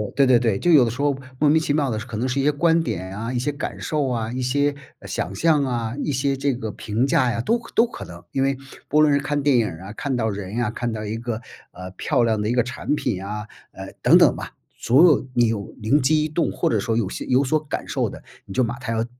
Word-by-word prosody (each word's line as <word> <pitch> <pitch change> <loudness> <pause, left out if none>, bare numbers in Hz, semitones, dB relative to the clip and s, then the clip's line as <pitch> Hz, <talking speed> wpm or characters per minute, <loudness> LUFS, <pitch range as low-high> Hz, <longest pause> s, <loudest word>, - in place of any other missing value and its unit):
对 140 - +5
对 125 -2 +6
对， 115 -5 +1
就 175 - +2
有 150 -6 +7
的 115 - 0
时 125 +5 -5
候 145 -2 +1 0.2
莫 150 -1 +4
名 160 - +5
其 150 - 0
妙 145 -2 +1
的 110 - -2
可 115 -1 -6
能 120 +4 -1
是 130 +2 -1
一 - - -1
些 150 - +4
观 165 +3 +2
点 95 - -4
啊， 115 +3 -4
一 125 - -1
些 145 +4 -1
感 140 - -5
受 150 -3 -1
啊， 115 -2 -2
一 130 - -3
些， 140 +3 +1 0.2
呃， - - -11
想 95 - -3
象 150 +7 +2
啊， 120 -3 -2
一 - - -1
些 135 +1 0
这 140 0 0
个 115 -3 -5
评 110 +6 -1
价 125 -2 +2
呀， 115 - -3
都 230 - +1
可 230 -1 -13
都 235 +1 +4
可 - - -9
能。 85 0 -11
因 135 - 0
为 135 0 +1 0.3
不 150 - +3
论 150 -1 +5
是 140 - +3
看 145 +1 -1
电 140 -2 +3
影 115 -2 +2
儿 80 +1 -8
啊， 105 - -8
看 140 +4 -3
到 110 -2 0
人 100 0 -5
呀， 120 -3 0
看 120 +1 -3
到 110 -1 -4
一 105 +1 -3
个， 115 -1 -4 0.3
呃， 90 +1 -9
漂 120 - 0
亮 110 -2 +1
的 105 - -1
一 - - +1
个 120 -1 +3
产 130 +4 -2
品 95 -9 -2
啊， 105 +1 -5 0.2
呃， - - -9
等 - - +6
等 - - +5
吧， - - -7 0.3
所 135 +9 +5
有 155 -5 +4
你 120 -1 +4
有 105 -3 -3
灵 135 +8 +2
机 155 +3 +2
一 - - -1
动 160 +2 0
或 - - 0
者 110 - +1
说 110 +3 -1
有 115 -5 0
些 - - -5
有 130 +2 +3
所 155 +4 +2
感 150 - -5
受 - - -1
的， - - -10 0.2
你 95 - -9
就 130 - +2
把 120 +1 -4
它 125 -2 -4
要 115 0 0
125 Hz, 305 characters per minute, -22 LUFS, 110-145 Hz, 0.3 s, 有